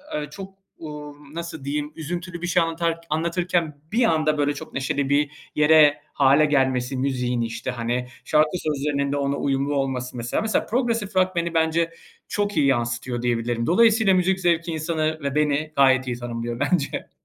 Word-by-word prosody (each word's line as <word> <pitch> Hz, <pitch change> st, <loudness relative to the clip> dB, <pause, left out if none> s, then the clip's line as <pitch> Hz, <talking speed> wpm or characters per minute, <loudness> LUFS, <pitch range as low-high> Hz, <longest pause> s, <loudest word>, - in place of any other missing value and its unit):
ııı, 150 Hz, -1 st, -3 dB
çok, 195 Hz, +3 st, -9 dB, 0.2 s
uuu, 150 Hz, -2 st, -8 dB, 0.2 s
nasıl 165 Hz, -4 st, -6 dB
diyeyim, 150 Hz, +1 st, -3 dB
üzüntülü 175 Hz, +2 st, -5 dB
bir 175 Hz, -, -2 dB
şey 175 Hz, -1 st, +3 dB
anlatar 165 Hz, 0 st, -1 dB
anlatırken 170 Hz, -1 st, -1 dB
bir 235 Hz, +3 st, +2 dB
anda 155 Hz, -3 st, +2 dB
böyle 145 Hz, 0 st, +1 dB
çok 145 Hz, -, -9 dB
neşeli 135 Hz, +1 st, -1 dB
bir 145 Hz, 0 st, +2 dB, 0.2 s
yere 150 Hz, -1 st, +5 dB
hâle 140 Hz, +2 st, +5 dB
gelmesi 130 Hz, -2 st, +1 dB
müziğin, 125 Hz, -2 st, -1 dB
işte, 115 Hz, +2 st, -3 dB
hani, 120 Hz, +1 st, -2 dB, 0.2 s
şarkı 150 Hz, 0 st, +3 dB
sözlerinin 140 Hz, -2 st, -1 dB
de 145 Hz, -, 0 dB
ona 140 Hz, 0 st, 0 dB
uyumlu 140 Hz, +1 st, 0 dB
olması. 130 Hz, -2 st, -2 dB
Mesela 120 Hz, 0 st, -1 dB
mesela 220 Hz, -2 st, 0 dB
progresif 230 Hz, -4 st, -1 dB
rock 185 Hz, 0 st, +2 dB
beni, 170 Hz, 0 st, -1 dB
bence, 165 Hz, +1 st, +1 dB, 0.4 s
çok 205 Hz, 0 st, -2 dB
iyi 140 Hz, -, +4 dB
yansıtıyor 120 Hz, -1 st, -1 dB
diyebilirim. 120 Hz, -1 st, -1 dB
Dolayısıyla 220 Hz, +1 st, +4 dB
müzik 185 Hz, +1 st, +2 dB
zevki 170 Hz, -1 st, +1 dB
insanı 155 Hz, 0 st, -1 dB
ve 140 Hz, 0 st, -2 dB
beni 150 Hz, +1 st, +1 dB
gayet 130 Hz, -1 st, +4 dB
iyi 120 Hz, -1 st, -2 dB
tanımlıyor 120 Hz, 0 st, -5 dB
bence. 145 Hz, 0 st, -1 dB
150 Hz, 165 wpm, -23 LUFS, 135-170 Hz, 0.4 s, yere